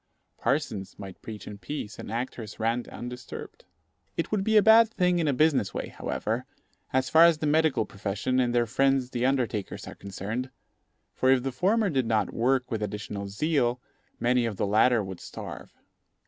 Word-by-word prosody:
Parsons 115 -10 -1
might 95 -2 -9
preach 110 -2 -8
in 100 -1 -8
peace, 110 0 -6
and - - -7
actors 115 -2 -5
rant 115 +2 0
undisturbed. 125 +1 -8 0.5
It 165 - -2
would 205 -2 +1
be 220 +1 +3
a - - +8
bad 225 0 +7
thing 180 -5 +1
in 160 - +1
a - - +4
business 140 -7 +2
way, - - -3
however, 115 +4 -3 0.5
as 130 0 +1
far 160 +4 +7
as 170 -2 +5
the 155 - -3
medical 155 -5 +3
profession 105 +6 -2
and 125 -1 +2
their 120 -1 +3
friends 135 +1 +1
the 125 +1 +1
undertakers 120 -7 -1
are - - -7
concerned; 105 +6 -5 0.6
for, 130 - +1
if 130 -2 +4
the 135 - -1
former 195 - +2
did 130 -5 +1
not 110 -2 +1
work 130 +2 +1
with 110 -2 -2
additional 105 -1 -4
zeal, 125 +2 0 0.4
many 120 0 +2
of 110 - -4
the - - 0
latter 110 +3 +4
would 95 -2 -7
starve. - - -8
125 Hz, 180 wpm, -27 LUFS, 110-145 Hz, 0.6 s, a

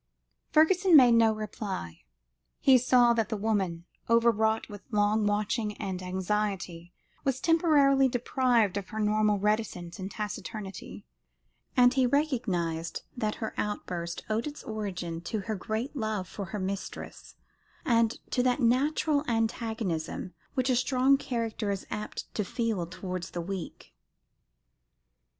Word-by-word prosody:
Fergusson 355 +3 +5
made 250 -3 +7
no 230 -1 +5
reply. 210 - -5 0.6
He 260 -2 +6
saw 245 -1 +5
that 225 -2 0
the 220 - -2
woman, 195 -6 -1 0.2
overwrought 225 -1 +3
with 205 -2 -9
long 210 -1 +2
watching 210 +1 -1
and 185 -1 -4
anxiety, 185 -2 -2 0.3
was 265 -1 0
temporarily 290 -5 +4
deprived 245 -4 +1
of 200 -2 -5
her 220 - -5
normal 210 0 +2
reticence 200 -4 -1
and 190 +1 -4
taciturnity, 210 -1 -6 0.7
and 245 0 +6
he 260 -1 +3
recognised 185 - -1
that 215 -4 -1
her 220 - -5
outburst 175 -5 -4
owed 220 +5 -1
its 295 - -8
origin 185 -7 -4
to 210 +4 -3
her 220 +3 -3
great 220 +8 -3
love 215 -6 -2
for 200 0 -6
her 210 +3 -5
mistress, 195 +1 -6 0.5
and 230 -2 +2
to 250 - +2
that 250 +2 +2
natural 285 +4 +2
antagonism 220 -7 -2 0.2
which 255 0 +1
a - - +3
strong 255 +2 +3
character 230 -5 -3
is 200 -1 -3
apt 210 0 -4
to 210 - -1
feel 210 -3 -2
towards 185 0 -5
the 175 - -4
weak. 185 0 -7
215 Hz, 130 wpm, -29 LUFS, 195-245 Hz, 0.7 s, made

